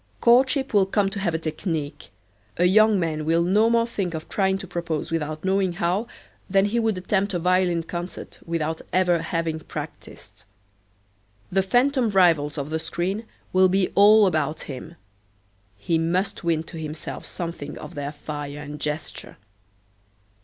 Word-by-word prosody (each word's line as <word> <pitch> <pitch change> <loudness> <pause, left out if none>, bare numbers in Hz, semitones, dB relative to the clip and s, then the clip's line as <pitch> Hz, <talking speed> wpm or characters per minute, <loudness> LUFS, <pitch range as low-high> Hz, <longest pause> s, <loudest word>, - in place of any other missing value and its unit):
Courtship 260 +3 +4
will 200 -2 +4
come 195 0 +1
to 200 - -4
have 175 -4 0
a - - +2
technique. 155 -2 -4 0.5
A 175 - +3
young 215 +2 +5
man 155 -3 -1
will 165 +2 +2
no 210 +6 +3
more 230 0 +3
think 195 -7 -3
of 155 - -6
trying 190 -1 +1
to 195 - -7
propose 170 -4 -3
without 155 0 -3
knowing 190 -1 +1
how 180 +6 -1 0.4
than 195 +1 +4
he 225 +3 0
would 220 -4 0
attempt 195 +1 0
a - - +2
violin 180 -1 +2
concert 175 +2 -7
without 160 -1 -2
ever 180 -2 +2
having 165 -1 -2
practiced. - - -9 1.1
The 195 - +3
phantom 245 +5 +2
rivals 165 -7 +3
of 145 +1 -4
the 160 - 0
screen 190 +7 -3 0.3
will 185 0 +5
be 190 0 +2
all 210 +1 +7
about 155 -3 0
him. 145 +4 -8 0.8
He 160 +11 0
must 180 +4 -1
win 165 -2 +1
to 165 0 -9
himself 155 0 -6
something 165 -4 -6
of - - -9
their 145 0 -4
fire 145 -1 -6
and 150 0 -7
gesture. 150 +1 -5
175 Hz, 160 wpm, -24 LUFS, 160-195 Hz, 1.1 s, all